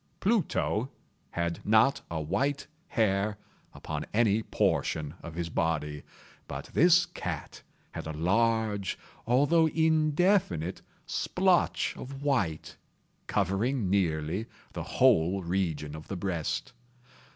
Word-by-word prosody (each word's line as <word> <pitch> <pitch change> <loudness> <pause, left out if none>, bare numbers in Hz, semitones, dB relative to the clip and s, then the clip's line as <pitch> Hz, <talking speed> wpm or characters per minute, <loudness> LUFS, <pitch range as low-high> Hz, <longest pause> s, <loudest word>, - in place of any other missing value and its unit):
Pluto 180 - +1 0.4
had 85 0 -3
not 110 +6 +4
a 85 - -2
white 105 - -1 0.2
hair 105 - +1 0.3
upon - - -5
any 110 -2 +3
portion 75 -7 0
of 80 -1 -8
his 85 -1 -3
body; 75 -3 -1 0.5
but - - -7
this 175 +2 +6
cat - - -6 0.3
had - - -6
a - - -3
large, 105 +4 +1 0.3
although 145 +7 +4
indefinite 160 - +2 0.2
splotch 185 -1 +1
of 135 +2 -8
white, 100 - -1 0.5
covering 105 +3 0
nearly 90 +2 0 0.3
the - - -4
whole 95 -7 +3
region 85 -4 -2
of 75 - -10
the 95 - -4
breast. 90 -4 -2
100 Hz, 105 wpm, -29 LUFS, 85-135 Hz, 0.5 s, this